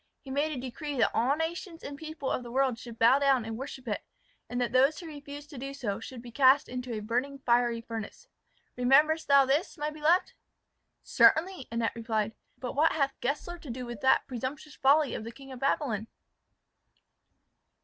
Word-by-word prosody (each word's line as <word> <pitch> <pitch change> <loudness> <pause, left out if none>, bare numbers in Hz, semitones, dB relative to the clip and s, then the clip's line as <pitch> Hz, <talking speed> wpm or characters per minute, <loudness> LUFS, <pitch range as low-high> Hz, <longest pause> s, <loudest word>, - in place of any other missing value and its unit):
He 270 - -10
made 290 +3 0
a 275 - -4
decree 275 +3 -5
that 240 - +3
all 255 +5 +2
nations 330 +1 -4
and 285 - -6
people 310 -2 -5
of - - -1
the 240 - -9
world 260 -2 +1
should 235 -1 -10
bow 235 +5 +5
down 270 -4 +3
and 225 0 -4
worship 260 0 -7
it, 210 - -2 0.5
and 245 - -2
that 245 - 0
those 270 +4 +4
who 350 - -9
refused 290 -1 -9
to 275 - -8
do 275 +2 -6
so 215 -7 -3
should 240 +1 -9
be 240 - -10
cast 270 +3 +5
into 250 0 -5
a 215 - -3
burning 250 +6 -2
fiery 235 -1 +2
furnace. 230 - -7 0.5
Rememberest 295 +6 +4
thou 280 -1 +6
this, 290 +8 0
my 300 0 -2
beloved?" 310 +4 +2 0.7
"Certainly," 350 -3 +3
Annette 230 -1 0
replied. 220 -2 -1 0.3
"But 250 - -5
what 310 +4 +3
hath 275 -3 0
Gessler 300 +7 -3
to 305 - -11
do 250 +1 -5
with 240 -4 -7
that 265 - +4
presumptuous 265 +4 -5
folly 285 +1 +4
of - - -4
the 230 - -7
King 270 +2 -13
of 255 - -8
Babylon?" 240 -6 0
270 Hz, 190 wpm, -29 LUFS, 240-295 Hz, 0.7 s, thou